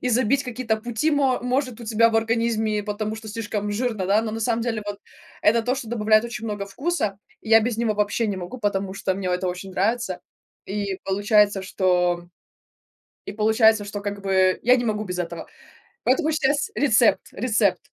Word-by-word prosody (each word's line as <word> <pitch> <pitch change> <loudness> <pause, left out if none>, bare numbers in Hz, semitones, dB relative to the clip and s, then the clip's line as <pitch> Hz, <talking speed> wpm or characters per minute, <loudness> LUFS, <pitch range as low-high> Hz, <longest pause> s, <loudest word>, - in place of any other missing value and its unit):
и 250 - -1
забить 255 +3 +2
какие-то 245 -3 -2
пути 240 +7 -1
мо 270 -3 +2
может 250 -1 -1
у 235 - -8
тебя 230 +1 +3
в 225 - +1
организме, 225 -1 0
и - - -2
потому 210 +1 -3
что 220 0 -9
слишком 210 -1 -3
жирно, 220 -2 -1
да, 205 +3 +3
но 220 -1 -4
на 225 - -4
самом 230 0 0
деле 225 -3 -2
вот 205 -1 -5 0.4
это 230 +2 +4
то, 250 +3 0
что 245 -4 -6
добавляет 215 -1 +3
очень 230 -2 -6
много 205 -2 -4
вкуса. 215 - -2 0.2
И 220 - -11
я 225 0 +8
без 225 0 -1
него 230 -2 0
вообще 210 +2 0
не 200 - -2
могу, 185 +7 -7
потому 195 -3 -1
что 190 -1 -1
мне 185 -1 -3
это 180 +1 -1
очень 185 +2 -6
нравится. 195 -1 -1 0.5
И 200 -1 -3
получается, 205 0 +2
что 180 -2 +1 1.0
и - - -5
получается, 220 0 +3
что, 205 0 -6
как 205 0 -5
бы, 190 -1 +2
я 250 +2 +6
не 245 - -1
могу 215 -1 -1
без 180 -1 -4
этого. 170 -1 -5 0.6
Поэтому 270 +5 +2
щас 295 +4 +1
рецепт 235 -5 +4
рецепт. 220 -3 +1
215 Hz, 195 wpm, -23 LUFS, 200-235 Hz, 1.0 s, я